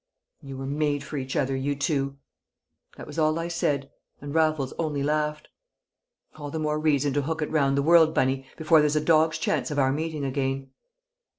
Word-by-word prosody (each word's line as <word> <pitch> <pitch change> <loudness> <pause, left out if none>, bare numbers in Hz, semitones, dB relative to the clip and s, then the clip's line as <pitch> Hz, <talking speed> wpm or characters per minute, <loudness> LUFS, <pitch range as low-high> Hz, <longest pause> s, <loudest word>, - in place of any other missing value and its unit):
"You 135 -3 -8
were 135 - -5
made 145 0 -1
for 150 +1 -6
each 130 -1 -4
other, 135 -1 0
you 140 +2 -1
two!" 140 -2 -1 0.8
That - - -8
was - - -6
all 155 0 +2
I 165 +1 -3
said, 140 -5 -1 0.3
and 145 0 -7
Raffles 155 -4 +1
only 150 -4 -1
laughed. 150 +1 -1 0.9
"All 145 -1 -6
the 160 - -4
more 150 -1 -1
reason 145 -3 +1
to 145 - +1
hook 160 +2 -2
it - - -5
round 140 -3 +2
the 140 - +2
world, 165 0 +6
Bunny, 130 0 +1
before 160 0 +4
there's 150 0 +2
a - - +4
dog's 160 0 +3
chance 130 -5 -1
of 150 - -4
our 135 -1 +3
meeting 155 0 -3
again." 135 0 -2
145 Hz, 195 wpm, -26 LUFS, 135-155 Hz, 0.9 s, world